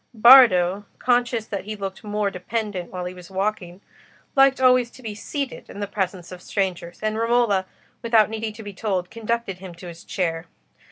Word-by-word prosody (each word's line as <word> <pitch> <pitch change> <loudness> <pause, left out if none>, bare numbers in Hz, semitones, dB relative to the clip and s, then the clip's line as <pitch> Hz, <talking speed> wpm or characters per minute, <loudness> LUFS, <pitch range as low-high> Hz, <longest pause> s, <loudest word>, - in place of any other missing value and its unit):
Bardo, 210 -6 +7
conscious 240 -2 +1
that 200 -3 -5
he 215 +1 -5
looked 195 -1 -6
more 210 -1 -1
dependent 195 -1 -4
when 180 -1 -5
he 180 - -5
was 180 -1 -13
walking, 190 -2 -3 0.5
liked 270 -1 +5
always 255 -2 +4
to 255 - -16
be 220 -2 -5
seated 275 +5 -5
in 200 - -9
the 205 - -1
presence 190 -3 -4
of 180 -1 -9
strangers, 180 -3 -3
and 215 0 -1
Romola, 230 -5 +2 0.3
without 230 -2 +4
needing 220 0 -4
to 220 - -10
be 205 -1 -8
told, 185 -3 -2
conducted 230 -4 -3
him 185 -2 -10
to 170 - -12
his 170 -1 -10
chair. 165 -2 -2
205 Hz, 180 wpm, -23 LUFS, 185-230 Hz, 0.5 s, Bardo